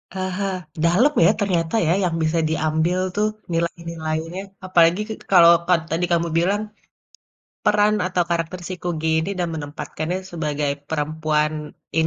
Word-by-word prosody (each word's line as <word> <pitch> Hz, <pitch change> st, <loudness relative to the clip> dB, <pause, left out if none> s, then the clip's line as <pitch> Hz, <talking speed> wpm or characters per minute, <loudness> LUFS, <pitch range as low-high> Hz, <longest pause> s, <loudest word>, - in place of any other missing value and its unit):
Aha. 185 Hz, +1 st, -2 dB, 0.4 s
Dalam 185 Hz, +13 st, +4 dB
ya -, -, +6 dB
ternyata, 175 Hz, -3 st, 0 dB
ya, 170 Hz, -, +4 dB
yang 170 Hz, -2 st, -1 dB
bisa 160 Hz, +1 st, +1 dB
diambil 160 Hz, +3 st, 0 dB, 0.2 s
tuh 210 Hz, +1 st, +2 dB, 0.2 s
nilai-nilainya. 165 Hz, 0 st, -3 dB, 0.2 s
Apalagi 175 Hz, +1 st, +4 dB
k -, -, -6 dB, 0.2 s
kalau 170 Hz, -2 st, +8 dB, 0.2 s
ka 180 Hz, -, +4 dB, 0.2 s
tadi 165 Hz, +2 st, +1 dB
kamu 170 Hz, 0 st, +2 dB
bilang 195 Hz, +5 st, +1 dB, 1.1 s
peran 210 Hz, 0 st, +4 dB
atau 180 Hz, -1 st, +1 dB
karakter 170 Hz, +1 st, -2 dB
si 185 Hz, -, -3 dB
Kugy 160 Hz, -2 st, -2 dB
ini 175 Hz, -, -3 dB
dan 175 Hz, -1 st, 0 dB
menempatkannya 155 Hz, +3 st, -4 dB
sebagai 150 Hz, -3 st, -2 dB, 0.2 s
perempuan 155 Hz, 0 st, 0 dB, 0.5 s
in 160 Hz, -, +3 dB
170 Hz, 140 wpm, -22 LUFS, 160-185 Hz, 1.1 s, kalau